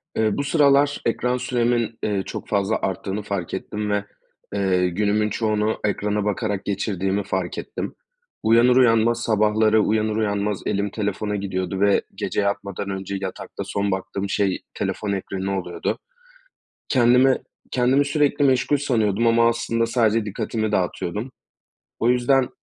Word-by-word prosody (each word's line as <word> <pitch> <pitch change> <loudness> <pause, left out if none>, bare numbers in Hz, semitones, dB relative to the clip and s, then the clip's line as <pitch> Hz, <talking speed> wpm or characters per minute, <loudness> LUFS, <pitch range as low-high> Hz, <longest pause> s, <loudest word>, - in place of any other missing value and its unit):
Eee, 110 -2 +1
bu 140 - 0
sıralar 145 -1 +3
ekran 125 +2 0
süremin, 120 -2 0
eee, 100 -2 0
çok - - -6
fazla 100 +1 0
arttığını 95 +2 -2
fark 100 -4 -4
ettim 105 +2 -3
ve, 105 0 0 0.5
eee, 95 -2 +2
günümün 105 +3 +1
çoğunu 105 0 0
ekrana 105 0 0
bakarak 105 -1 -2
geçirdiğimi 100 -1 -1
fark 95 -2 -3
ettim. - - -5 0.5
Uyanır 115 +3 +5
uyanmaz 115 -1 +4
sabahları 110 0 +3
uyanır 110 0 +1
uyanmaz 105 -2 -1
elim 100 +1 0
telefona 105 0 -2
gidiyordu 95 -1 -3
ve 100 -1 +4
gece - - -1
yatmadan 100 0 -2
önce 95 0 -4
yatakta 95 -1 -6
son 100 0 -1
baktığım 95 +1 -3
şey 100 -2 0
telefon 105 -1 -3
ekranı 95 0 -2
oluyordu. 90 -1 -3 0.9
Kendimi 125 +1 +5 0.3
kendimi 130 +3 +3
sürekli 145 0 +2
meşgul 130 +2 +3
sanıyordum 115 -5 +1
ama 115 0 +5
aslında 115 0 0
sadece 115 -2 +2
dikkatimi 110 +1 -2
dağıtıyordum. 105 +5 -2 0.7
O 115 - +2
yüzden 125 +1 +3
105 Hz, 135 wpm, -23 LUFS, 100-115 Hz, 0.9 s, Uyanır